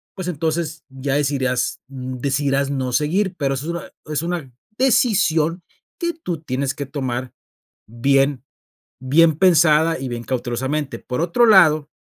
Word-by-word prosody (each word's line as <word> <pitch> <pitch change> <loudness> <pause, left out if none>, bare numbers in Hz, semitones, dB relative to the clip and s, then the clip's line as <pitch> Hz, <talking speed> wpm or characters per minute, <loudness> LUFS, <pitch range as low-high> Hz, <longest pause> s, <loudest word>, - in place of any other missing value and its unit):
Pues, 185 -2 -5
entonces, 160 -1 -2
ya 135 +1 -3
decidirás 135 -3 0
decidirás 135 +1 -1
no 130 -2 -2
seguir, 180 +6 0
pero 140 -2 0
eso 135 - -5
es - - -1
una 170 - -6 0.2
es 150 - 0
una 170 -6 -4 0.3
decisión 180 -10 +2 0.4
que 340 -1 -1
tú 180 - -5
tienes 135 -2 -2
que 140 - -4
tomar 130 -2 -4 0.5
bien 135 +3 +1 0.6
bien 155 +4 +4
pensada 165 -3 +4
y 135 - -4
bien 120 -1 -5
cautelosamente, 130 +2 -2
por 125 +5 -4
otro 180 +8 +3
lado 155 -8 +5
145 Hz, 140 wpm, -20 LUFS, 130-165 Hz, 0.6 s, lado